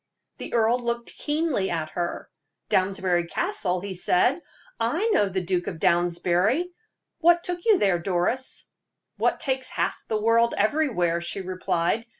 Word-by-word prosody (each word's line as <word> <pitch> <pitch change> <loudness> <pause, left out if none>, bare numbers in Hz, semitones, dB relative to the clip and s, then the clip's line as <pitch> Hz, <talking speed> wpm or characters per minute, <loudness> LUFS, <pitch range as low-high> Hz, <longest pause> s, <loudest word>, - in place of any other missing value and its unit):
The - - -5
earl 230 +2 +3
looked 235 -1 -3
keenly 295 -10 -1
at 160 -2 -3
her. 175 -1 -4 0.4
"Downsbury 185 -2 +1
Castle!" 195 - -1
he 200 0 -5
said. 185 - +2 0.4
"I 330 - 0
know 205 - +3
the 190 0 -2
Duke 180 -1 -1
of - - -4
Downsbury. 175 - +2 0.5
What 345 +1 +4
took 355 -1 -4
you 440 -4 +5
there, 190 - +2
Doris?" 190 +9 -2 0.5
"What - - +1
takes 260 -2 -1
half - - -1
the 220 - -1
world 230 +2 +3
everywhere?" 205 - +1
she 175 +3 -3
replied. 185 +3 -1
200 Hz, 145 wpm, -25 LUFS, 180-260 Hz, 0.5 s, you